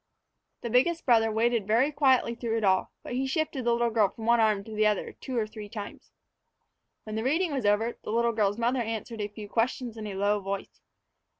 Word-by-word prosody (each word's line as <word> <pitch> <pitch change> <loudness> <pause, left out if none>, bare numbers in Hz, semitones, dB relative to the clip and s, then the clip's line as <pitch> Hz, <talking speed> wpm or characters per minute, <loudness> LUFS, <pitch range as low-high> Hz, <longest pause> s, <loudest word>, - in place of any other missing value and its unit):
The 235 - -4
biggest 325 +8 +2
brother 225 -3 +4
waited 225 -1 +1
very 240 +7 +3
quietly 265 -5 +3
through 230 -1 -2
it 225 - -2
all, 190 -2 +2
but - - -6
he 265 +2 -1
shifted 300 -2 -1
the 240 - +3
little 235 0 +1
girl 215 -3 +3
from 220 +2 -9
one 235 0 +4
arm 215 -3 +2
to 220 - -10
the 215 0 +3
other 210 -2 -1
two 260 -3 -6
or 225 - +1
three 215 -1 -9
times. 205 -1 -8 0.9
When 215 -1 -6
the 220 - -2
reading 315 +5 +1
was 260 -7 0
over, 220 +3 +1
the - - -5
little 235 +1 +2
girl's 205 -2 +1
mother 240 +2 +1
answered 225 0 -4
a 205 - -1
few 210 0 -9
questions 235 +1 -1
in 215 -1 -5
a 200 - -5
low 205 +2 +1
voice. 195 0 -6
225 Hz, 220 wpm, -28 LUFS, 210-245 Hz, 0.9 s, brother